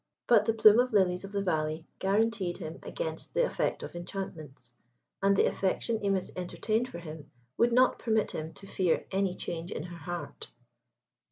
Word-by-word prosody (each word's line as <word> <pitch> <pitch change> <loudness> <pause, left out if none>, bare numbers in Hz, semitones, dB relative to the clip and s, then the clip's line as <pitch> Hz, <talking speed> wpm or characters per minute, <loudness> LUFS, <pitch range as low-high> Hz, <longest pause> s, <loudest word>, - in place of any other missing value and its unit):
But 240 - +5
the 225 - +2
plume 215 0 +7
of 250 -1 +2
lilies 185 -3 +3
of 195 - -9
the 200 -1 -1
valley 155 -2 -1
guaranteed 200 -2 +1
him 160 +1 -7
against 160 - -5
the - - +4
effect - - -1
of - - -8
enchantments, 155 -8 -7 0.5
and 195 0 +4
the - - +5
affection 215 +4 0
Imis 195 -3 0
entertained 215 +6 -1
for - - -7
him 155 -3 -9 0.3
would 240 +1 +3
not 255 +1 +4
permit 220 -3 +1
him 155 +1 -5
to 195 - -13
fear 185 -3 0
any 190 -1 0
change 170 -1 -5
in - - -4
her 175 0 -8
heart. 175 +2 -6
190 Hz, 175 wpm, -30 LUFS, 165-215 Hz, 0.5 s, plume